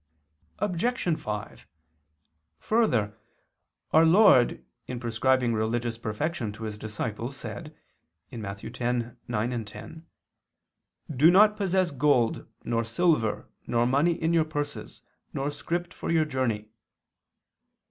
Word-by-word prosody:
Obj. 185 -2 0
5: 105 -1 -6 0.9
Further, 115 - +1 0.7
our 160 - +6
Lord 165 - +5 0.2
in 125 - -4
prescribing 120 +1 +1
religious 115 +1 -1
perfection 115 +2 -2
to 110 - -9
His 110 -1 -4
disciples, 110 +4 -4
said - - -8 0.5
(Matt. 105 -5 -6
10:9, 120 -1 -3
10): 160 +9 -11 1.1
"Do 150 +6 +6
not 210 +4 +6
possess 190 -3 +1
gold, 130 -4 +2 0.2
nor 115 -1 0
silver, 115 -2 +1 0.2
nor 120 0 +2
money 140 +7 +3
in 165 0 -1
your 165 -1 +4
purses, 145 -2 -5 0.3
nor 140 +2 -2
script 175 +4 -3
for - - -6
your 160 -2 +3
journey." 120 -7 -2
130 Hz, 105 wpm, -27 LUFS, 115-165 Hz, 1.1 s, our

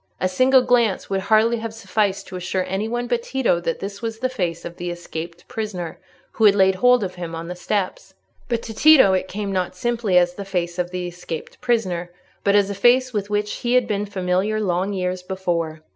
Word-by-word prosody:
A 185 - +1
single 255 +7 +4
glance 240 -6 +1
would 195 - +1
hardly 220 +3 +3
have 225 0 -6
sufficed 200 -2 -1
to - - -9
assure 185 +1 -2
any 195 +3 -2
one 240 +1 -2
but 240 -1 0
Tito 250 -8 0
that 165 -1 -2
this 200 +1 -6
was 225 -1 -4
the 255 +3 -1
face 175 -9 -3
of 170 0 -7
the 175 0 -4
escaped 170 0 -7
prisoner 205 -7 -5 0.3
who 225 - +1
had 200 -1 +7
laid 190 -1 +4
hold 250 +4 +4
of 185 -1 -4
him 170 -2 -6
on 165 +1 -6
the 180 - -5
steps. 190 +1 -3 0.3
But 235 -2 -1
to 225 - -6
Tito 270 -5 +6
it 185 0 0
came 200 +1 -4
not 185 -1 -1
simply 230 -2 +1
as 175 0 +4
the 200 - -6
face 180 -2 -3
of 175 0 0
the 180 0 -4
escaped 175 -2 -7
prisoner, 190 -8 0 0.3
but 200 0 +3
as 200 -1 +3
a - - -2
face 245 +5 +3
with 205 -1 -2
which 210 0 -1
he 240 0 0
had 250 -2 +3
been 205 0 -1
familiar 190 +2 0
long 190 -1 0
years 185 -1 -2
before. 170 -4 -3
195 Hz, 220 wpm, -22 LUFS, 180-225 Hz, 0.3 s, had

